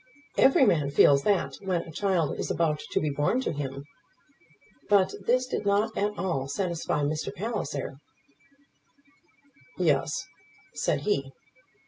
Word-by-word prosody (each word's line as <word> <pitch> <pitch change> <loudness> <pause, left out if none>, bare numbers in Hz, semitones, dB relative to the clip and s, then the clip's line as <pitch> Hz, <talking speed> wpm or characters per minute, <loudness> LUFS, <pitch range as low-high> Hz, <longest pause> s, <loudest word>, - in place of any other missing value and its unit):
"Every 270 +1 +6
man 150 -9 +2
feels 140 0 +5
that 205 -3 +1
when 185 -3 -1
a 165 - -11
child 180 -3 0
is - - -3
about 155 -3 0
to - - +1
be 150 -1 -1
born 145 - +1
to - - -2
him." 140 -1 -5 1.1
But 195 -2 +4
this 255 +2 +3
did 250 - -3
not 205 +2 +1
at 205 +1 -1
all 170 -7 -1
satisfy 170 -3 -2
Mr. 155 +2 -2
Palliser. 155 - -4 1.8
"Yes," 165 -6 +1 0.5
said - - 0
he. 140 -7 -1
170 Hz, 130 wpm, -27 LUFS, 145-205 Hz, 1.8 s, Every